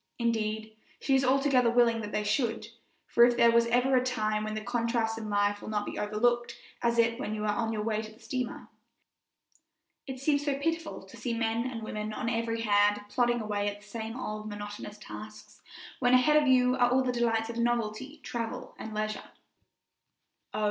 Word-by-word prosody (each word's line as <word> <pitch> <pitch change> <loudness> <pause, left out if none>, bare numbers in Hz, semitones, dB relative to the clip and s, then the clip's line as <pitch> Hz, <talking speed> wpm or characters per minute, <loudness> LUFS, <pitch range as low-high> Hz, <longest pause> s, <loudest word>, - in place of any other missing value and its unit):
Indeed, 220 -2 -1 0.2
she 275 - 0
is 265 0 +4
altogether 260 -2 +3
willing 235 -1 +3
that 210 -1 -6
they 210 - -1
should, 225 0 -1 0.4
for 235 - +4
if 240 0 +5
there 235 -1 +5
is 235 0 +5
ever 250 +3 +3
a 250 - +4
time 215 -4 0
when 215 0 -3
the 215 - -3
contrasts 230 -1 -1
in 215 -1 -6
life 205 0 +1
will - - -7
not 210 -1 -1
be - - -5
overlooked 235 +3 +1 0.3
it 235 0 +2
is 230 +1 +3
when 215 -5 -3
you 210 - -4
are 210 -1 +1
on 225 0 -1
your 215 -1 -2
way 215 -1 0
to 215 0 -9
the 220 - -19
steamer. 245 +2 -4 1.4
It 265 -1 -6
seems 285 +1 +1
so 285 -2 0
pitiful 330 - -2
to 190 - -14
see 235 -2 -2
men 230 +2 0
and 230 -3 -6
women 215 0 -4
on 230 +2 -2
every 230 0 -1
hand 205 -1 +3
plodding 240 0 +1
away 205 -1 -1
at 205 0 -9
the 210 - -17
same 225 +3 -5
old, 215 -3 -5
monotonous 205 0 -7
tasks, 215 0 -11 0.4
when 250 0 +4
ahead 300 +4 +5
of 290 - 0
you 250 -1 +4
are 245 -1 +4
all 260 +1 +3
the 255 - 0
delights 230 -2 0
of 235 - -5
novelty, 240 +4 -1
travel, 230 -2 -5
and 220 -1 -6
leisure. 215 0 -3 1.2
Oh! - - -4
230 Hz, 200 wpm, -29 LUFS, 215-245 Hz, 1.4 s, if